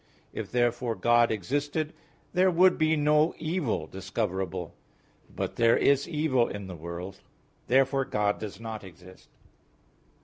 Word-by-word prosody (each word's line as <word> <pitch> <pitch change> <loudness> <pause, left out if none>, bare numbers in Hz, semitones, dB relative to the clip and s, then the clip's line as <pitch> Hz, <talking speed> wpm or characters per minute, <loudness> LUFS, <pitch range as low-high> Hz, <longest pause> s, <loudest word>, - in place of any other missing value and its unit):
If, - - -5
therefore, 120 -1 0
God 120 +4 +4
existed, 145 - -2 0.4
there 185 +1 +4
would 180 +1 +5
be 155 0 +3
no 150 +2 +3
evil 155 - -2
discoverable; 95 -1 -4 0.6
but - - -5
there 115 0 +4
is 140 +2 +2
evil 150 -7 +1
in 100 -1 -6
the 95 -1 -7
world. 85 +4 -7 0.5
Therefore 135 +1 +3
God 105 -3 0
does 105 -1 -7
not 110 -2 -6
exist. 95 0 -15
120 Hz, 130 wpm, -28 LUFS, 95-150 Hz, 0.6 s, would